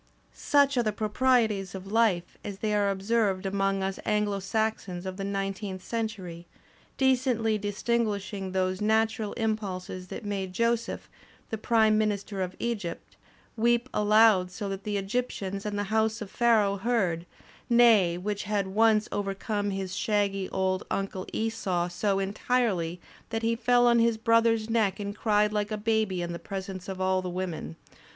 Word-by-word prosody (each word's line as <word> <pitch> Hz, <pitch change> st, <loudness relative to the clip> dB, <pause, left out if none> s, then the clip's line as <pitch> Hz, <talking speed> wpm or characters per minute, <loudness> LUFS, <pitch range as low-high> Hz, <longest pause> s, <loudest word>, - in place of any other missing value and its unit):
* -, -, -36 dB
"Such 285 Hz, -2 st, +2 dB
are -, -, +5 dB
the 215 Hz, -2 st, 0 dB
proprieties 215 Hz, -3 st, +1 dB
of 190 Hz, 0 st, -7 dB
life, 210 Hz, -6 st, +2 dB
as 200 Hz, -2 st, -6 dB
they 210 Hz, +1 st, -1 dB
are 205 Hz, -1 st, +2 dB
observed 195 Hz, -1 st, 0 dB
among 195 Hz, 0 st, 0 dB
us 195 Hz, 0 st, -3 dB
Anglo 210 Hz, -2 st, 0 dB
Saxons 195 Hz, -3 st, -2 dB
of 185 Hz, 0 st, -5 dB
the 195 Hz, -, -4 dB
nineteenth 195 Hz, -1 st, -3 dB
century, 195 Hz, -7 st, -4 dB, 0.5 s
decentiy 245 Hz, -5 st, +2 dB
disguising 205 Hz, -2 st, -1 dB
those 185 Hz, 0 st, -1 dB
natural 220 Hz, 0 st, +1 dB
impulses 195 Hz, -5 st, -3 dB
that -, -, -7 dB
made 195 Hz, -2 st, -3 dB
Joseph, 230 Hz, +2 st, -1 dB, 0.4 s
the 220 Hz, -, -1 dB
Prime 220 Hz, -1 st, +3 dB
Minister 205 Hz, -2 st, -1 dB
of 185 Hz, 0 st, -3 dB
Egypt, 210 Hz, -8 st, -4 dB, 0.4 s
weep 240 Hz, +2 st, +2 dB
aloud 210 Hz, -3 st, +5 dB
so 200 Hz, +3 st, -5 dB
that 195 Hz, 0 st, -5 dB
the 210 Hz, -1 st, -2 dB
Egyp 205 Hz, +6 st, -1 dB
tians 195 Hz, -2 st, -5 dB
and 205 Hz, -1 st, -3 dB
the 205 Hz, -, 0 dB
house 220 Hz, 0 st, +2 dB
of 205 Hz, -3 st, -7 dB
Pharaoh 215 Hz, -4 st, +3 dB
heard 185 Hz, -7 st, 0 dB, 0.3 s
— -, -, -28 dB
nay, 225 Hz, -8 st, +5 dB
which 205 Hz, +3 st, -3 dB
had 205 Hz, -1 st, 0 dB
once 215 Hz, +1 st, +3 dB
overcome 205 Hz, +1 st, -2 dB
his 195 Hz, -2 st, -3 dB
shaggy 200 Hz, -3 st, 0 dB
old 185 Hz, 0 st, 0 dB
uncle 195 Hz, -1 st, -3 dB
Esau 200 Hz, -6 st, -1 dB
so 195 Hz, +3 st, 0 dB
entirely 195 Hz, -3 st, 0 dB, 0.3 s
that 225 Hz, 0 st, -3 dB
he 230 Hz, 0 st, +2 dB
fell 245 Hz, +1 st, +3 dB
on 235 Hz, -1 st, +5 dB
his 230 Hz, -1 st, +3 dB
brother's 230 Hz, -1 st, +3 dB
neck 220 Hz, -4 st, +1 dB
and 205 Hz, 0 st, -4 dB
cried 210 Hz, -1 st, +2 dB
hke 210 Hz, -1 st, -1 dB
a 215 Hz, -, -2 dB
baby 215 Hz, -4 st, 0 dB
in 170 Hz, 0 st, -4 dB
the 170 Hz, -, -5 dB
presence 190 Hz, -1 st, -6 dB
of 190 Hz, -1 st, -5 dB
all 185 Hz, 0 st, +1 dB
the 185 Hz, -, -4 dB
women. 175 Hz, -, -4 dB
205 Hz, 165 wpm, -28 LUFS, 190-225 Hz, 0.5 s, are